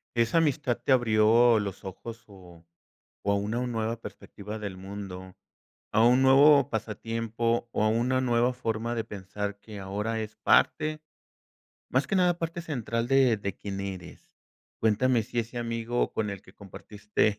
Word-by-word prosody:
Esa 115 +7 +2
amistad 145 -5 +1
te 120 +3 0
abrió 115 -1 +5
los 100 -2 -5
ojos 115 +5 -8
o 90 -4 -16 0.6
o 100 - +2
a - - +3
una 110 +5 -1
nueva 115 -1 -3
perspectiva 105 -1 -9
del 100 -3 -5
mundo, 95 -1 -8 0.6
a 110 +1 +4
un 125 +2 +5
nuevo 140 +1 +6
pasatiempo 115 +1 -2
o 110 - 0
a - - +3
una 125 +3 +1
nueva 120 0 +2
forma 115 -1 -2
de 115 -2 -2
pensar 100 0 -6
que 105 -1 -10
ahora 105 +4 -3
es 110 0 -6
parte 155 0 +2 0.9
más 130 +2 +1
que 195 - 0
nada, 180 -2 +3
parte 170 0 -4
central 120 -7 -3
de 130 -4 +4
de 100 -2 -4
quién 100 -1 -6
eres, 95 -3 -8 0.4
cuéntame 115 +2 +2
si 120 +2 -3
ese 115 +2 -5
amigo 115 0 -1
con 105 -1 -1
el 100 -1 -6
que - - -18
compartiste 105 +1 -2
115 Hz, 160 wpm, -27 LUFS, 105-120 Hz, 0.9 s, nuevo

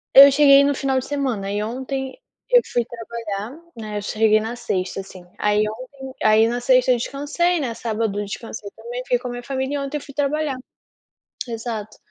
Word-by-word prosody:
Eu 280 +1 +11
cheguei 280 0 +7
no 285 0 +2
final 265 -1 +1
de 260 - -6
semana, 255 -9 -2
e 205 +1 -1
ontem 265 +3 -4 0.3
eu - - +7
fui 240 -2 +1
trabalhar, 230 +2 -6 0.2
né, 215 -2 -5
eu 205 - -2
cheguei 215 +1 +3
na 225 +3 -4
sexta 185 -4 -2
assim, 185 -2 -12 0.2
aí 210 0 +2
ontem 260 +4 -8
aí 220 +1 +5
na 240 +1 -2
sexta 255 0 +4
eu 245 - +4
descansei, 300 +8 0
né, 245 -5 -2
sábado 220 -3 -2
eu 205 - -2
descansei 215 0 -7
também, 240 +3 -6
fiquei 250 -1 +1
com 250 +1 -7
a - - -4
minha 245 0 -5
família, 265 +1 -2
e - - -1
ontem 275 +2 -3
eu 290 - -7
fui 280 - -12
trabalhar. 290 0 0 0.9
Exato. 225 -2 -5
245 Hz, 200 wpm, -22 LUFS, 215-275 Hz, 0.9 s, Eu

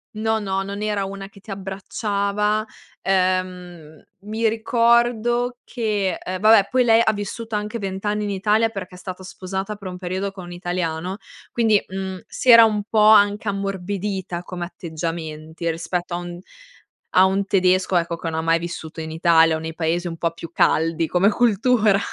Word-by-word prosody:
no, 220 +1 0
no, 195 -2 -2
non 200 +1 -6
era 210 -2 -1
una 195 0 -7
che 200 - -17
ti 200 - -11
abbracciava. 200 +2 -1 0.4
Ehm, 180 -4 -1 0.2
mi 220 +2 -1
ricordo 235 +1 +2
che 210 -5 -1
ehm, 185 0 -5
vabbè, 215 -1 +6
poi 255 -1 +4
lei 230 -1 +5
ha 220 - +2
vissuto 215 +2 -5
anche 210 +2 -3
20 195 0 -5
anni 210 0 0
in 205 - -2
Italia 210 +3 +2
perché 195 -4 -7
è - - -11
stato 185 0 -8
sposata, 190 +2 -5
per 200 -2 -9
un 180 - -7
periodo, 185 +2 -3
con 190 -2 -10
un 175 - -10
italiano, 175 0 -3 0.3
quindi, 220 -3 +3
mhmm, 190 0 -5
si 255 - -3
era 230 -1 +10
un 210 -2 0
po' 220 - +2
anche 210 0 +5
ammorbidita 195 -2 -3
come 180 -1 -5
atteggiamenti, 160 -1 -5
rispetto 175 +2 -3
a - - -1
un 175 0 -7 0.8
a 185 - +7
un 190 +1 +1
tedesco, 185 -1 +2
ecco, 170 0 -1
che 165 - -4
no 160 - -4
ha - - 0
mai 165 +1 +2
vissuto 165 -1 -6
in 160 - -6
Italia 165 0 +4
o - - -3
nei 160 0 -5
paesi 165 +2 -1
un 165 -1 -5
po' 170 - 0
più 165 -1 -9
caldi 165 0 +2
come 180 +4 +3
cultura. 220 -2 +3
195 Hz, 180 wpm, -22 LUFS, 175-210 Hz, 0.8 s, era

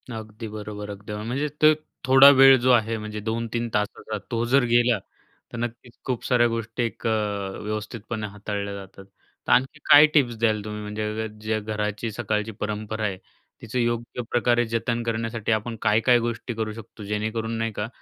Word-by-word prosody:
अगदी 110 +1 -7
बरोबर 105 -1 -7
अगदी. 105 +1 -7
म्हणजेच 125 +8 -3
ते 155 0 +7 0.3
थोडा 135 +2 +9
वेळ 135 0 +9
जो 130 +1 +4
आहे 115 -2 +3
म्हणजे 105 0 -6
2-3 115 +2 -2
तासाचा, 105 +1 -2
तो 115 0 0
जर 130 +2 +4
गेला 120 0 +3 0.5
तर - - -5
नक्कीच 120 +1 -5
खूप 125 -3 -2
साऱ्या 120 -1 +4
गोष्टी 115 +1 -3
एक 115 0 -3
अ, - - +3 0.5
व्यवस्थितपणे 110 +1 -4
हाताळल्या 100 0 -5
जातात. 95 0 -11 0.4
तर - - +1
आणखी 135 +4 +3
काय 145 +1 +10
टिप्स 125 -6 +3
द्याल 110 -2 +1
तुम्ही 105 0 -5
म्हणजे 105 +1 -3
ज्या 110 0 -1
घराची 105 +1 -3
सकाळची 110 -1 -2
परंपरा 105 +1 -3
आहे 100 -3 -2 0.4
तिचं 115 +2 -3
योग्य 120 +1 -1
प्रकारे 120 0 +2
जतन 115 +1 -1
करण्यासाठी 115 -1 -2
आपण 110 +2 -1
काय-काय 115 +3 +4
गोष्टी 120 +1 -3
करू 110 -1 -3
शकतो? 110 -1 -11
जेणेकरून 110 +2 -2
नाही 115 0 -1
का, 105 +1 -3
115 Hz, 165 wpm, -24 LUFS, 105-120 Hz, 0.5 s, काय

